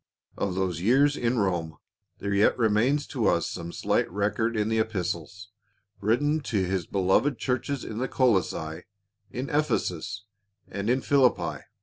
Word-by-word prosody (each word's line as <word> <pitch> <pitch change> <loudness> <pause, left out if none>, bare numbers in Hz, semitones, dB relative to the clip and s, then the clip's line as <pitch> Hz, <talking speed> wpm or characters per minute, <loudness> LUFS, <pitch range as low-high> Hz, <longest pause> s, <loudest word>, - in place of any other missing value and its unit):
Of 95 -2 -2
those 90 -3 -1
years 135 +8 +4
in 120 -1 0
Rome 85 -6 -1 0.4
there 100 0 -3
yet 100 +1 +3
remains 120 +6 +2
to 120 -7 -1
us 85 - +2
some 85 0 -6
slight - - 0
record 105 +4 0
in 105 0 +1
the 110 0 +1
Epistles 100 -2 -3 0.5
written 145 +9 +1
to 105 -9 -1
his 90 -2 -2
beloved 100 +8 +2
churches 130 +1 -2
in 110 - -5
Colossae, 95 -11 0 0.4
in 130 +3 -4
Ephesus, 105 - -1 0.4
and 100 +2 -3
in 130 +2 +2
Philippi. 135 -3 +2
105 Hz, 140 wpm, -27 LUFS, 95-125 Hz, 0.5 s, years